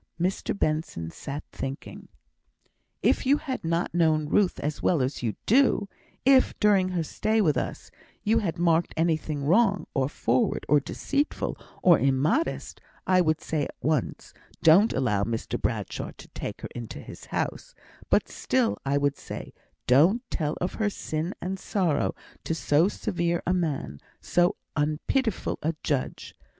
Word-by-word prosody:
Mr 185 +3 -1
Benson 155 - -1
sat 145 - -6
thinking. 135 +1 -6 1.0
"If - - +3
you 280 +2 +5
had 270 -5 -4
not 165 +1 -1
known 155 -3 +2
Ruth 200 0 +2
as 150 +1 -3
well 175 - +2
as 130 +2 -1
you 115 -4 -1
do 240 -4 +4 0.4
if 265 -1 +4
during 200 -3 +4
her 175 -3 -1
stay 215 +7 0
with 160 -9 +3
us - - -4 0.3
you 225 +2 +3
had 180 -5 -2
marked 170 -1 +2
anything 155 -3 0
wrong, 200 +5 +3
or 135 -1 +1
forward, 125 -3 0
or 150 +1 +5
deceitful, 280 - -2 0.3
or 175 -3 +7
immodest, 140 - 0 0.2
I 185 -1 +4
would 160 -2 +1
say 150 -3 -1
at - - -9
once, 150 -4 -1 0.3
'Don't 185 +8 +6
allow 105 -7 +1
Mr 115 +1 -3
Bradshaw - - -3
to - - -12
take - - -6
her - - -6
into 120 -2 -7
his - - -10
house;' - - -3 0.3
but - - +3
still 255 -3 0
I 140 +1 +1
would 145 0 +1
say, - - -8 0.3
'Don't 170 - +4
tell 150 -3 -1
of 180 - -2
her 210 - +3
sin 165 -2 -4
and 190 +2 -4
her - - -14
sorrow 175 -8 0 0.3
to 165 - -1
so 160 +2 +3
severe 175 -5 -1
a 180 - +2
man 140 - -2 0.2
so 175 0 +2 0.2
unpitiful 160 - 0
a 160 +1 -1
judge.' 140 -4 -2
165 Hz, 155 wpm, -27 LUFS, 145-195 Hz, 1.0 s, or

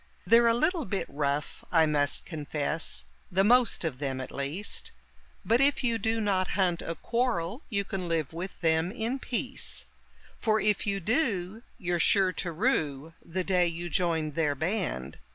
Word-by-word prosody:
They're 235 +1 +6
a 230 - +4
little 315 +4 +1
bit 200 -3 -2
rough, 140 0 -2
I 165 -2 +5
must 145 -2 +1
confess, 150 - -1 0.3
the 190 +2 +3
most 240 -3 +4
of 135 -6 -3
them, 135 -2 -2
at 130 - -6
least; 145 +9 -2 0.5
But 230 +3 +3
if 275 -1 +3
you 230 -2 +2
do 225 0 0
not 195 -4 +1
hunt 180 -3 +2
a 165 - -4
quarrel 230 - -1
you 200 -4 +1
can 185 -2 -4
live 160 -2 -1
with 180 +3 -6
them 160 +1 +2
in 235 +4 -2
peace; 255 +1 -2 0.5
For 220 -1 +2
if 210 0 +1
you 200 -1 +1
do, 215 - 0 0.2
you're 175 -1 -1
sure 190 +2 +4
to 175 - -3
rue 160 - 0
the 185 +2 -3
day 180 -2 +2
you 170 0 -4
joined 160 -2 0
their 150 -2 +1
band. 160 - -2
180 Hz, 170 wpm, -28 LUFS, 160-225 Hz, 0.5 s, They're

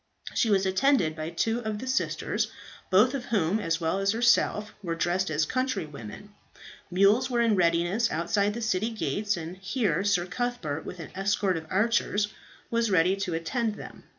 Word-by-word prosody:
She 230 - +2
was 195 -2 +3
attended 190 - +2
by 155 0 -4
two 225 +8 0
of 220 -3 -3
the 255 - -6
sisters, 260 +1 -1 0.4
both 215 +8 +5
of 265 -3 -3
whom, 200 -2 +1
as 165 -5 -1
well 165 +3 0
as 195 +1 +1
herself, 225 -2 +2
were 170 -4 -3
dressed 175 +2 0
as 155 0 +1
countrywomen. 195 - -4 0.6
Mules 200 +8 +3
were 240 -2 0
in 230 -2 +3
readiness 175 +5 +2
outside 200 +6 0
the 235 - -4
city 220 +1 0
gates, 215 -2 -1
and 170 +2 -6
here 205 +1 0
Sir 195 -4 +2
Cuthbert, 180 -6 -3
with 180 - -7
an 165 - -8
escort 195 0 0
of 160 -1 -5
archers, 205 0 +1 0.4
was 230 -1 +1
ready 185 0 +3
to 190 -4 -2
attend 220 +6 -1
them. - - -11
200 Hz, 175 wpm, -27 LUFS, 175-225 Hz, 0.6 s, both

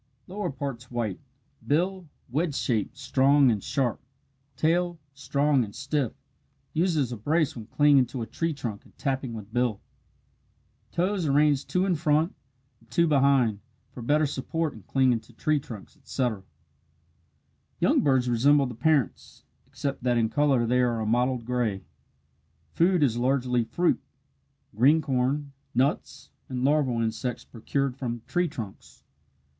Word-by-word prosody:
Lower 200 +3 -4
parts 135 -3 -6
white 115 -6 -3 0.5
bill 180 +3 0 0.2
wedge 145 +4 -1
shaped, 115 -1 -1
strong, 135 0 +4
and 105 -3 -2
sharp 125 -5 -1 0.5
tail 175 +4 +1 0.2
strong 140 0 +1
and 105 -2 -8
stiff, 135 -1 -1 0.6
used 170 0 +1
as 130 -5 0
a 120 - -4
brace 150 +7 +1
when 110 -3 -8
clinging 145 -1 +4
to 120 -1 -5
a - - -4
tree 165 +7 -2
trunk 120 -8 -5
and - - -23
tapping 130 -4 -2
with 110 0 -9
bill 120 -4 +1 1.1
toes 180 -1 0
arranged 145 0 +2
two 185 +1 +1
in 190 - +2
front 155 +2 +1 0.5
and - - -26
two 170 - +3
behind 135 -8 +3 0.3
for 125 - -9
better 150 +6 +2
support 150 +3 -2
in - - -12
clinging 130 -3 +2
to 110 - -20
tree 155 -2 +1
trunks, 115 -5 -10
etc. 125 -7 -2 1.4
Young - - +3
birds 130 -3 +2
resemble 140 +4 +4
the 125 - -5
parents, 145 - 0 0.2
except 140 -1 -4
that 120 -1 +1
in 115 -1 +2
colour 140 -4 +2
they 125 +2 +2
are 120 -2 +1
a 110 - -2
mottled 120 +2 +1
gray. 120 -5 -1 0.9
Food 175 -1 +3
is 120 -5 +2
largely 125 -1 +1
fruit 170 +10 +1 0.7
green 140 +9 +5
corn, 140 0 -1 0.2
nuts, 130 +3 -1 0.2
and 125 -1 -3
larval 135 -5 +2
insects 115 +2 -3
procured 130 +3 -2
from 120 -4 -4
tree 175 0 0
trunks. 115 -11 -9
135 Hz, 145 wpm, -27 LUFS, 120-150 Hz, 1.4 s, green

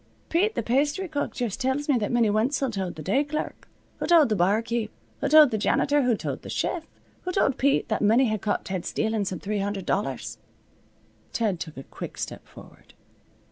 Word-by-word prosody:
"Pete 405 +6 +2
th' 225 - -2
pasthry 290 +9 +1
cook 295 -3 -2
just 240 0 -3
tells 265 +3 0
me 285 - +3
that 205 - -2
Minnie 235 -3 +3
Wenzel 250 +5 +1
told 190 -4 -3
th' 155 - -8
day 235 - +2
clerk, 300 +1 -5 0.3
who - - -2
told 330 -6 +6
the 215 - +2
barkeep, 215 +4 +1 0.3
who - - -1
told 305 -2 +8
th' 215 - -1
janitor, 285 +7 +2
who 245 -4 +2
told - - -4
th' - - -9
chef, 330 -3 -2 0.3
who 365 - -3
told 315 -8 +1
Pete, 275 +1 +2
that 220 - 0
Minnie 225 +6 +4
had 215 -3 -1
caught 205 - -1
Ted 185 -2 -3
stealin' 220 -2 -1
some 185 -1 -3
three 210 +1 -2
hundred 195 -1 -3
dollars." 205 +3 -2 0.9
Ted 210 -7 0
took 160 -4 -7
a 135 - -7
quick - - -8
step - - -6
forward. - - -16
230 Hz, 200 wpm, -26 LUFS, 205-285 Hz, 0.9 s, told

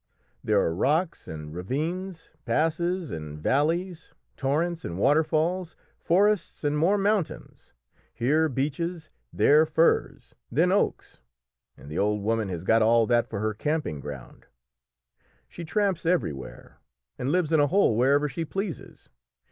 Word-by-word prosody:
There - - +2
are 80 - +1
rocks 155 - 0
and 75 -1 -8
ravines, 165 - -4
passes 170 +2 0
and 75 -2 -6
valleys, 160 - -1 0.2
torrents 160 +5 -1
and 85 - -5
waterfalls, 160 - +1 0.2
forests, 195 0 +1
and 145 0 +1
more 170 +7 +3
mountains; 200 -3 -2 0.4
here 155 +7 +1
beeches, 155 +5 -3 0.2
there 150 +2 +5
firs, 160 +2 +1 0.2
then 165 +8 +2
oaks, 200 - -1 0.6
and - - -14
the 75 +3 -4
old 105 0 0
woman 110 -1 0
has 85 -2 -5
got 115 +4 +3
all 115 +1 +4
that 120 0 +2
for 105 -2 -4
her 110 0 0
camping 150 - -2
ground. 70 -3 -10 1.0
She 175 - -9
tramps 195 0 0
everywhere, 75 - -3 0.4
and 125 +3 -1
lives 175 -2 +1
in 160 - +4
a 145 - +4
hole 185 - +3
wherever 140 +5 +3
she 145 +4 -4
pleases. 195 +2 -6
150 Hz, 135 wpm, -26 LUFS, 115-170 Hz, 1.0 s, there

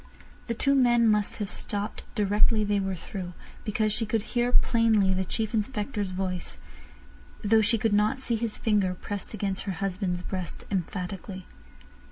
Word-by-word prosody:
The 235 - -1
two 275 +5 +3
men 240 -3 +5
must 210 -1 +2
have 210 - -3
stopped 205 +1 -4
directly 210 +2 +3
they 205 -1 +1
were 190 -1 -1
through, 180 +1 -6 0.3
because 215 -1 +1
she 225 - -1 0.3
heard 245 +1 +4
plainly 225 -5 +3
the 190 0 +1
Chief 215 +4 -2
Inspector's 210 -2 -1
voice, 185 -1 -3 0.9
though 220 +1 +5
she 225 +2 +3
could 220 0 +1
not 210 +4 +3
see 250 -3 -1
his 225 -1 -2
finger 200 -4 +2
pressed 205 +3 -5
against 195 -3 -2
her 195 - -1
husband's 180 -1 -2
breast 185 -2 -5
emphatically. 185 0 -3
205 Hz, 155 wpm, -27 LUFS, 190-225 Hz, 0.9 s, men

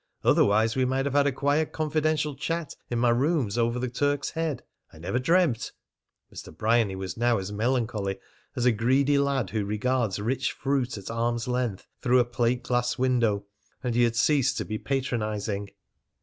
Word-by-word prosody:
Otherwise 110 +2 +3
we 130 - +2
might 130 +1 0
have 140 - -1
had 145 0 +4
a - - +2
quiet 145 +4 0
confidential 155 -1 0
chat 165 +2 -3 0.2
in 120 - -1
my 120 0 +3
rooms 130 -3 +1
over 120 0 +1
the 125 +1 -1
Turk's 145 +3 -1
Head. 160 -3 -2 0.3
I - - -15
never 90 +10 -2
dreamt 160 -3 +2 0.3
" - - -31
Mr. - - -9
Bryany 110 -1 +2
was 95 +1 -5
now 120 0 +2
as 95 +1 -4
melancholy 110 -3 -1 0.4
as 125 -2 -1
a 125 - +6
greedy 130 +6 +2
lad 135 -8 0
who 110 -1 -1
regards 105 +1 0
rich 130 +5 -1
fruit 135 -4 -1
at 100 +2 -7
arm's 115 +1 -1
length 125 -6 -2 0.2
through 125 -1 +3
a 125 - +4
plate 120 +1 0
glass 120 0 0
window, 120 -6 +1 0.4
and 125 -2 -1
he 120 - +2
had 115 -1 +2
ceased 135 +1 +2
to - - -2
be 110 0 -4
patronising. 105 -6 -2
120 Hz, 180 wpm, -26 LUFS, 110-135 Hz, 0.4 s, a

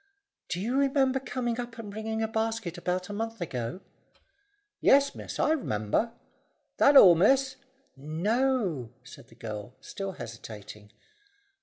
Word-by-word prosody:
"Do 175 - -2
you 235 +7 -1
remember 270 -1 +2
coming 245 -3 -3
up 240 -1 -6
and 215 -3 -7
bringing 220 +1 -3
a - - +1
basket 220 -4 -2
about 180 +1 -2
a - - -5
month 225 +1 -4
ago?" 125 0 -4 1.0
"Yes, 280 +1 +5
miss, - - -7
I - - +2
r'member. 215 - 0 0.7
That 280 0 +6
all, 185 -8 +10
miss?" 265 +10 +3 0.4
"No," 175 - 0
said 125 - -13
the 115 - -19
girl, 110 0 -7
still 195 -1 -6
hesitating. 105 - -10
210 Hz, 135 wpm, -28 LUFS, -, 1.0 s, all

